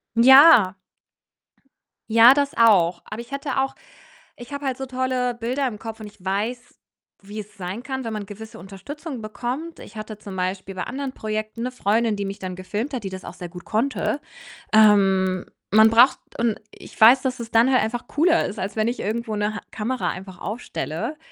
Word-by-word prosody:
ja. 255 - +8 1.3
Ja, 230 +3 +8
das 285 -1 0
auch. 185 -7 +4
Aber 215 +2 -7
ich 240 +3 -11
hätte 275 0 -3
auch 270 0 -1 0.6
ich 240 +3 -11
habe 285 0 -6
halt 260 -2 -1
so 265 - -4
tolle 255 -1 -1
Bilder 250 +4 -1
im 210 -3 -8
Kopf 225 0 -8
und 215 - -7
ich 205 -3 -16
weiß, 220 +6 -3 0.4
wie 205 +2 -7
es 210 +1 -12
sein 190 +5 -5
kann, 265 0 -4
wenn 225 - -4
man 210 -1 -4
gewisse 220 +2 -10
Unterstützung 250 - -8
bekommt. 250 +9 -5
Ich 210 - -12
hatte 215 0 -7
zum 195 -2 -9
Beispiel 185 +1 -3
bei 185 - -4
anderen 270 0 -5
Projekten 215 +1 -4
'ne 250 - -2
Freundin, 225 -2 0
die 200 - -3
mich 195 +1 -5
dann 185 -1 -6
gefilmt 215 +9 -4
hat, 240 -5 -4
die 195 - -4
das 190 0 -8
auch 170 - -8
sehr 175 -1 -8
gut 180 0 -11
konnte. 265 +5 -1 0.5
Ähm, 195 -4 +4 0.3
man 220 +1 +7
braucht 235 +4 +5 0.2
und 230 -2 0
ich - - -14
weiß, 240 +4 +8
dass 255 -1 -2
es 230 -1 -6
dann 230 +3 +4
halt 255 - +4
einfach 235 +2 -3
cooler 335 +3 +2
ist, 205 - -7
als 190 +2 -4
wenn 220 +1 +1
ich 245 - -4
irgendwo 220 +1 -3
'ne 210 +1 -1
Ha - - -6
Kamera 240 +4 -2
einfach 185 -1 -8
aufstelle 215 - -5
225 Hz, 195 wpm, -23 LUFS, 200-255 Hz, 1.3 s, ja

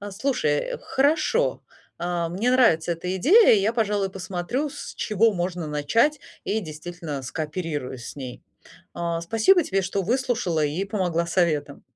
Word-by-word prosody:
А, 205 0 -7
слушай, 280 - -1
хорошо. 310 - +1 0.4
А, 175 -1 -1
мне 200 +8 0
нравится 175 -10 +4
эта 180 +2 -4
идея. 400 - +6
И 200 - +3
я, 215 +4 +1
пожалуй, 205 -4 0
посмотрю, 190 +10 -3
с - - -8
чего 215 +1 +2
можно 175 -2 -3
начать, 225 - +1 0.2
и, 220 +2 0
действительно, 155 -3 -6
скооперируюсь 150 -4 -4
с - - -10
ней, 130 -3 -7 0.5
а, 170 -1 -2
спасибо 225 - +4
тебе, 195 -4 0
что 195 +1 -2
выслушала 225 - 0
и 155 +7 -1
помогла 180 -5 -1
советом. 155 -5 0
185 Hz, 145 wpm, -24 LUFS, 165-230 Hz, 0.5 s, идея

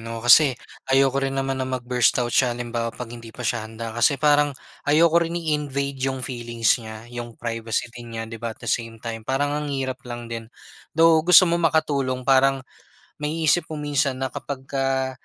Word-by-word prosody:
'no? 115 +1 -7
Kasi 130 +1 +7 0.3
ayoko 135 0 +3
rin 135 0 -2
naman 135 -1 -1
na 130 - -2
mag-burst 125 -2 +1
out 120 -1 -1
siya 120 -2 +2
halimbawa 120 -1 -3
'pag 120 0 -8
hindi 115 -1 -10
pa 125 +2 -9
siya 110 -2 -1
handa. 115 0 -6
Kasi 120 +4 +2
parang 145 -1 +3 0.3
ayoko 165 +3 +5
rin 170 0 -2
i-invade 140 -4 -2
yung 130 -1 -4
feelings 120 -2 0
niya' 110 +2 -10
yung 120 -1 -7
privacy 115 0 -3
din 120 -1 -9
niya 115 - -3
di 115 0 -9
ba, 115 -1 -5
at - - -13
the - - -5
same 115 -1 -2
time, 115 0 -6
parang 135 +5 -1
ang 150 0 -2
hirap 135 -1 -3
lang 120 0 -6
din. 115 -1 -7 0.5
Though 165 -1 +6
gusto 180 +2 +7
mong 170 -1 +2
makatulong 135 -5 0
parang 135 0 +3 0.6
maiisip 155 +2 +1
mo 155 - -6
minsan 145 -2 0
na 130 0 -3
kapagka 135 -1 -2
130 Hz, 190 wpm, -23 LUFS, 120-145 Hz, 0.6 s, Kasi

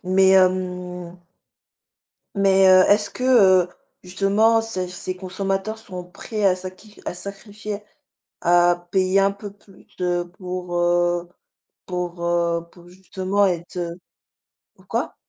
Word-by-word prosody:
Mais 190 +1 +4
hem 180 -1 0 1.2
mais 195 -1 +4
heu, 185 0 +7
est-ce 205 0 +3
que, 250 - -7 0.4
heu, 175 - -10 0.3
justement 200 +5 +2
ces 185 -5 -4
ces 185 0 -5
consommateurs 195 +3 -3
sont 185 -5 -8
prêts 210 +4 -6
à 185 -2 +4
sa 185 0 -7
qui 205 +3 -18
à - - -3
sacrifier, 205 +2 -7 0.6
à 175 0 +3
payer 190 0 +2
un 195 0 +3
peu 200 0 -9
plus, 200 -1 -21
heu, 175 -1 -1
pour, 180 -1 -5
heu, 175 0 +1 0.6
pour, 180 -1 -4
heu, 170 -1 0
pour 175 -1 -17
justement 190 +2 -1
être, 175 -1 -3
heu 170 -1 -3 0.8
pourquoi? - - -4
185 Hz, 130 wpm, -22 LUFS, 175-195 Hz, 1.2 s, heu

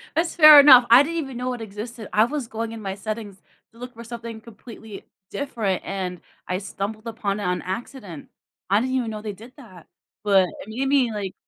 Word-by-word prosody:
That's 335 +2 -1
fair 305 -3 +10
enough. 260 -4 +8
I 245 +4 +8
didn't 335 +3 -4
even 270 -6 -5
know 250 0 -3
it 240 - -7
existed. 220 +1 -8
I 215 +1 +4
was 280 -1 -4
going 225 0 -5
in 225 -1 -8
my 195 -1 -5
settings 210 -2 -7 0.3
to 230 - -22
look 250 0 -9
for 235 +1 -11
something 230 -1 -8
completely 220 -2 -12 0.2
different, 225 -9 -3
and 185 -2 -5 0.3
I 180 - -2
stumbled 210 +3 -6
upon 210 -3 -3
it 205 - -5
on 180 0 -1
accident. 190 - -7 0.4
I 200 +2 +3
didn't 260 +1 -2
even 240 -3 -1
know 215 -1 -7
they 210 -1 -6
did 230 +6 -15
that, 185 - -15 0.4
but 195 -3 +3
it - - -9
made 255 +5 -3
me, 270 -4 +2
like, 200 -3 -5
225 Hz, 210 wpm, -23 LUFS, 200-250 Hz, 0.4 s, fair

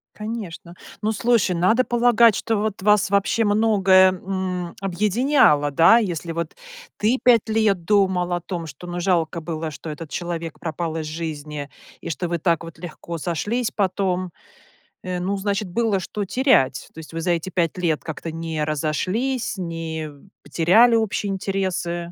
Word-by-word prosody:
Конечно. 210 -6 -7 0.3
Ну, 215 +1 0
слушай, 220 -4 +2
надо 220 +9 +3
полагать, 235 -3 +4
что 225 -2 -1
вот 210 -2 -2
вас 210 -2 +4
вот 200 - +2
вообще 210 +3 +1
многое, 195 -3 +5
м, 185 -2 -4
объединяло, 195 - +2
да, 165 +10 +6
если 175 -6 -2
вот 170 -1 -4 0.4
ты 225 +5 +2
5 235 -3 +4
лет 215 -5 +2
думал 185 -3 +2
о 175 - -1
том, 170 -2 -5
что, 145 +4 -10
ну, 175 0 -4
жалко 170 -2 0
было, 160 -1 -4
что 155 +2 -8
этот 150 0 -7
человек 170 -2 -4
пропал 165 -1 -3
из 155 - -3
жизни, 150 -2 -5 0.3
и - - -6
что 175 +2 -3
вы 170 - 0
так 165 0 0
вот 165 -1 -10
легко 170 0 -7
сошлись 205 +9 -2
потом, 185 -2 0 0.7
э, 180 -1 -3
ну 190 +3 -1
значит 200 0 -2
было 215 0 +1
что 205 +3 -4
терять, 205 - +2
то 160 - -10
есть 160 - -11
вы 165 - -3
за 175 +1 0
эти 170 +2 -1
5 170 -1 -1
лет 165 -4 0
как-то 160 +1 -6
не 165 -1 -3
разошлись, 185 - -1
не 165 -3 -4 0.3
потеряли 220 +9 +4
общие 210 -2 0
интересы. 185 -3 -2
180 Hz, 165 wpm, -22 LUFS, 165-210 Hz, 0.7 s, да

